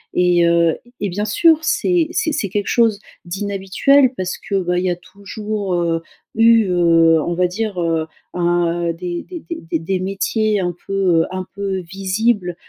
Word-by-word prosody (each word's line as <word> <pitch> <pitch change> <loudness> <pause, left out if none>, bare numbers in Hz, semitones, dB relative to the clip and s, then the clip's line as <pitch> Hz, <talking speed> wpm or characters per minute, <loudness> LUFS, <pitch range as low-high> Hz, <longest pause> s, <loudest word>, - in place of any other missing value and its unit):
et 175 -1 +3
heu 170 -1 +3 0.2
et 205 - -2
bien 205 +4 -2
sûr 320 +9 +4
c'est 335 0 +1
c'est 320 - 0
c'est 200 -9 -2
quelque 205 +1 -2
chose 225 -4 +2 0.3
d'inhabituel 200 +8 +2
parce 185 -3 -3
que 200 -1 -4
bah, 180 0 0
il 185 - -2
y - - +2
a 175 - 0
toujours 200 +2 -5
heu, 170 -1 0 0.3
eu 225 0 +5
heu, 165 -2 +4
on 175 - -2
va 180 0 +2
dire 200 0 -3
heu, 165 -1 0 0.3
un 175 -1 0
heu 165 - -1
des 175 0 -5
des 345 -3 -9 0.3
des 165 - +1
des 185 +3 -2
métiers 200 +3 0
un 175 -2 -2
peu 195 - -4 0.3
heu - - 0
un 185 - -4
peu 195 -1 -3
visibles, 190 +1 -1
190 Hz, 180 wpm, -19 LUFS, 175-210 Hz, 0.3 s, eu